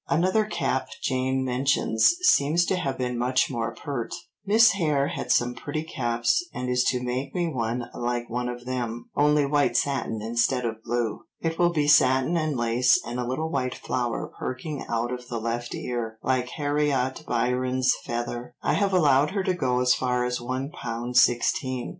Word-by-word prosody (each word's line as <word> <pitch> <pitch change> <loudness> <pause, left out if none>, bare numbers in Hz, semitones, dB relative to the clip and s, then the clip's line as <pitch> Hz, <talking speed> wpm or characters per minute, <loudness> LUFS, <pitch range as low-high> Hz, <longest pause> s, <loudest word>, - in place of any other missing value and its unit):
Another 185 +6 +2
cap 170 -9 -1 0.2
Jane 130 0 0
mentions 130 - +2
seems 160 - +4
to 190 - 0
have 155 -7 -2
been 125 -1 -2
much 125 +2 +1
more 115 -3 -2
pert: 135 -5 -4 0.3
"Miss 220 +2 +6
Hare 150 -7 +1
had 125 - -3
some 120 +1 +2
pretty 145 +5 -4
caps 120 - 0
and 125 0 -4
is 125 0 +2
to 125 -1 0
make 130 +2 -3
me 175 -1 0
one 120 -4 -2
like 120 0 -2
one 125 +1 -2
of 120 0 -7
them, 120 -2 -4
only 150 0 +3
white 145 0 +2
satin 135 -5 -1
instead 120 +3 0
of 110 -1 -4
blue. 120 -2 -2
It 165 0 -3
will 175 -1 +5
be 150 -4 0
satin 130 +1 +4
and 155 -4 0
lace 120 +2 +3
and 120 +2 -4
a 125 - -2
little 155 +6 -2
white 130 -3 -1
flower 120 -2 -3
perking 140 +3 -4
out 120 +2 -1
of 125 0 -7
the 120 - -4
left 115 +1 -3
ear, 115 -2 -4
like 130 -1 0
Harriot 145 -3 -1
Byron's 125 +2 +1
feather. 120 +1 -4
I - - +2
have 200 -1 +1
allowed 145 -5 +4
her 195 0 -2
to 185 - +1
go 125 -7 0
as 125 0 +4
far 125 -1 0
as 125 0 -2
one 130 +4 -3
pound 120 0 -5
sixteen." 125 +1 +2
125 Hz, 180 wpm, -25 LUFS, 120-145 Hz, 0.3 s, Miss